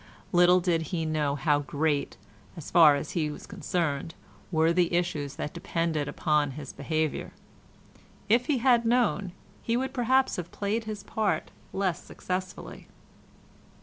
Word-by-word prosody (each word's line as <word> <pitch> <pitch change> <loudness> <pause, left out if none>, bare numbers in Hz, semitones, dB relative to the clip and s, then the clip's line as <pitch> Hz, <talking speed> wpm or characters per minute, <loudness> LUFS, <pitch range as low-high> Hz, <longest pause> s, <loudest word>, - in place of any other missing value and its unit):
Little 180 0 +6
did 170 -2 +1
he 160 +1 -3
know 150 -2 0
how 145 0 +2
great, 145 +1 -1 0.4
as 160 - -8
far 155 -4 +7
as 145 +1 -4
he 155 -3 0
was 150 - -8
concerned, 165 -6 -2 0.4
were 160 0 +3
the 175 -1 +2
issues 155 -5 -1
that 150 - -5
depended 165 -4 -1
upon 150 -2 +1
his 145 -3 -7
behaviour. 155 +1 -2 0.9
If 235 +4 +3
he 290 - +2
had 240 -1 +4
known, 230 -5 +1 0.3
he 230 +1 0
would 265 +1 -2
perhaps 260 +1 +2
have 175 -1 -5
played 215 +3 -2
his 210 -2 -6
part 215 0 -1 0.2
less 185 -3 -1
successfully. 185 0 -6
170 Hz, 145 wpm, -28 LUFS, 150-200 Hz, 0.9 s, far